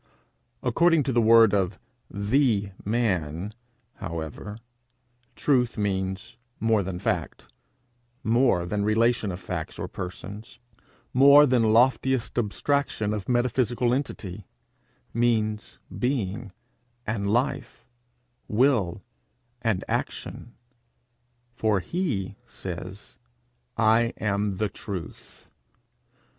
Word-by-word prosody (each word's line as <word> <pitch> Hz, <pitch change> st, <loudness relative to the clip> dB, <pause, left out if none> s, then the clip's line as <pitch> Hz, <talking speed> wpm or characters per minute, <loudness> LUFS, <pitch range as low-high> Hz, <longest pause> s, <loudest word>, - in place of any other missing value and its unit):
According 165 Hz, -3 st, +3 dB
to 135 Hz, -, -1 dB
the 120 Hz, -, +4 dB
word 115 Hz, -2 st, +6 dB
of 95 Hz, -2 st, +1 dB, 0.3 s
the 105 Hz, -1 st, +1 dB
man, 100 Hz, -5 st, -1 dB, 0.4 s
however, 85 Hz, -, -6 dB, 0.8 s
truth 125 Hz, -5 st, +1 dB
means 95 Hz, +2 st, -2 dB, 0.2 s
more 110 Hz, -2 st, +3 dB
than 95 Hz, -1 st, -4 dB
fact, 90 Hz, -3 st, -2 dB, 0.8 s
more 115 Hz, -6 st, +3 dB
than 100 Hz, +3 st, -1 dB
relation 110 Hz, 0 st, +2 dB
of 90 Hz, -, -6 dB
facts -, -, -5 dB
or -, -, -4 dB
persons, 100 Hz, +4 st, -8 dB, 0.6 s
more 140 Hz, +3 st, +8 dB
than 120 Hz, -5 st, +3 dB
loftiest 125 Hz, +1 st, +2 dB
abstraction 115 Hz, -1 st, 0 dB
of 105 Hz, 0 st, -4 dB
metaphysical 120 Hz, 0 st, +1 dB
entity 105 Hz, -8 st, -4 dB, 0.7 s
means 110 Hz, -3 st, 0 dB, 0.2 s
being 115 Hz, -5 st, -2 dB, 0.5 s
and 100 Hz, -2 st, -1 dB
life, 125 Hz, +1 st, -1 dB, 0.6 s
will 105 Hz, -6 st, +2 dB, 0.6 s
and 110 Hz, -5 st, 0 dB
action; 120 Hz, -, -4 dB, 1.0 s
for 110 Hz, -4 st, +1 dB
he 105 Hz, -, -2 dB
says, 95 Hz, -1 st, -8 dB, 0.6 s
'I 115 Hz, +1 st, +3 dB
am 100 Hz, -1 st, 0 dB
the 105 Hz, +2 st, +1 dB
truth.' 95 Hz, -2 st, -8 dB
110 Hz, 95 wpm, -26 LUFS, 100-120 Hz, 1.0 s, more